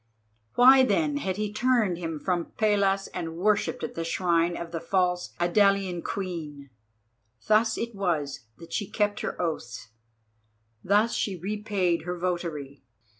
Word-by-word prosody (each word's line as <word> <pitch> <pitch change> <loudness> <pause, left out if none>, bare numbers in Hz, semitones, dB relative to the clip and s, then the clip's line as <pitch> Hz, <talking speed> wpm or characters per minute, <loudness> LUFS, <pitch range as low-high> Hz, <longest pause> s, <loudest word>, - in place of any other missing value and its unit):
Why 260 +2 +8
then 295 +2 +1
had 190 -9 -2
he 210 -1 -2
turned 215 -6 +1
him 165 -3 -4
from 175 +1 -2
Pallas 200 -2 +2
and 165 -1 -5
worshipped 210 +6 +1
at 245 - -4
the 165 - -3
shrine 170 0 +1
of 170 -1 -6
the 165 - -3
false 180 0 0
Idalian 190 0 +2
Queen? 155 -9 -5 0.7
Thus 220 +1 +3
it 235 0 -3
was 155 - -2
that 165 - -12
she 205 -3 -2
kept 210 0 0
her - - -4
oaths; 120 -10 -4 0.9
thus 210 +4 +3
she 200 - -1
repaid 195 -2 -1
her 180 +1 -4
votary. 165 -6 -3
185 Hz, 140 wpm, -27 LUFS, 170-210 Hz, 0.9 s, Why